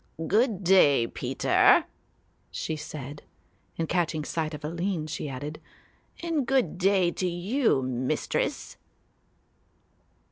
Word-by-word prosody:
"Good 215 -1 +1
day, 150 -9 +5
Peter," - - +3 0.7
she 160 - -4
said, 150 -1 -8 0.6
and 165 - -1
catching 160 -3 0
sight 155 -2 -2
of 150 - -8
Aline 170 +1 -2
she 155 -1 -5
added, 145 +4 -6 0.6
"and 320 -7 -1
good 265 -8 +1
day 190 -2 +3
to 185 - -2
you, 180 - +1
Mistress." 130 0 -2
170 Hz, 105 wpm, -27 LUFS, 150-195 Hz, 0.7 s, day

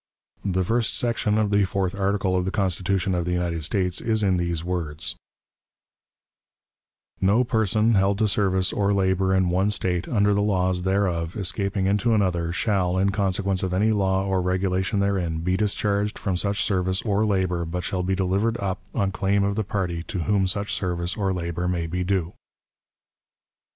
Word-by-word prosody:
The 95 -2 0
first 115 +4 0
section 115 -3 0
of 105 -2 +1
the 100 0 +4
fourth 95 -1 -1
article 100 -1 0
of 90 - +1
the 95 - -1
Constitution 95 -1 0
of 90 -1 0
the 90 - -1
United 85 -2 -1
States 90 +3 0
is 110 -2 0
in 95 -2 +2
these 85 -2 -1
words: 85 -4 -2 2.1
"No 100 +6 +4
person 110 -1 +1
held 100 0 +2
to 110 0 +2
service 95 -2 +1
or 100 0 +1
labor 95 -1 +1
in 95 -2 +2
one 95 +3 +2
State, 90 -4 -1
under 105 -3 +2
the 100 - +1
laws 95 -3 +1
thereof, 95 -2 0
escaping 100 +1 -2
into 105 +4 +2
another, 90 -5 0
shall, 95 -2 0
in 100 +1 +2
consequence 100 -1 0
of 95 -2 -1
any 105 +4 +3
law 95 -2 +1
or 95 -1 0
regulation 95 +2 0
therein, 90 -5 -1
be 90 +2 0
discharged 105 +1 0
from 95 -4 -2
such 100 +3 0
service 95 -1 0
or 105 -1 +1
labor, 95 -4 0
but 90 +2 -4
shall 95 -3 -2
be 95 +1 0
delivered 100 +5 0
up 95 -3 -3 0.2
on 95 -1 +1
claim 100 +1 +1
of 100 0 +1
the 110 - 0
party 95 -4 -2
to 90 - -3
whom 100 -1 +2
such 100 +2 -2
service 90 0 -2
or 100 -2 0
labor 85 -1 -3
may 85 -2 -1
be 90 +2 -2
due." 90 -2 -1
95 Hz, 175 wpm, -24 LUFS, 90-100 Hz, 2.1 s, the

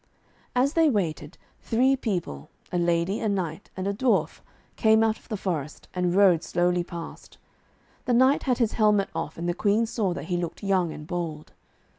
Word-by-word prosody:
As 265 +4 +2
they 325 -2 +4
waited, 170 - -2 0.2
three 255 +4 +2
people, 175 - -4 0.2
a 180 - 0
lady, 170 +4 +1
a 220 - -1
knight 185 -2 -3
and 190 +1 -2
a 200 - 0
dwarf, 245 +4 +1 0.4
came 220 -1 +4
out 220 -1 +1
of - - -24
the 215 - -2
forest, 155 -6 -4
and 180 -1 0
rode 190 -5 +5
slowly 175 0 +1
past. 170 -1 -9 0.7
The 245 - +1
knight 260 +4 +4
had 250 - +3
his 230 -4 +1
helmet 210 -3 +2
off, 155 - -4
and 170 +1 -3
the 175 - +1
Queen 210 +5 +2
saw 215 -4 -1
that - - -5
he 175 +1 -1
looked 175 +3 -5
young 185 -4 +1
and 150 - -8
bold. 165 -3 -5
190 Hz, 185 wpm, -26 LUFS, 170-220 Hz, 0.7 s, rode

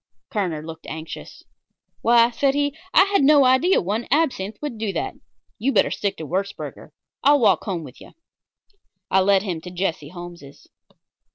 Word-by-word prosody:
Kerner 175 -7 -2
looked 160 0 -10
anxious. 160 0 -8 0.6
"Why," 235 0 +5
said 270 +3 +1
he, 285 0 0 0.2
"I - - +7
had 395 -2 +1
no 285 -1 +6
idea 260 +9 +4
one 210 +6 -2
absinthe 245 -9 0
would 290 -7 -5
do 215 -2 -1
that. - - -3 0.5
You'd 270 +4 0
better - - +3
stick 200 -1 -2
to 160 - -6
Würzburger. 195 +5 -4 0.3
I'll 290 +1 +5
walk 215 -5 +3
home 180 -6 -3
with 130 -4 -13
you." - - -14 1.0
I 190 - +5
led 195 0 +3
him 175 -6 -4
to 180 - -8
Jesse 175 -5 -3
Holmes's. 175 -5 -11
200 Hz, 165 wpm, -22 LUFS, 175-270 Hz, 1.0 s, I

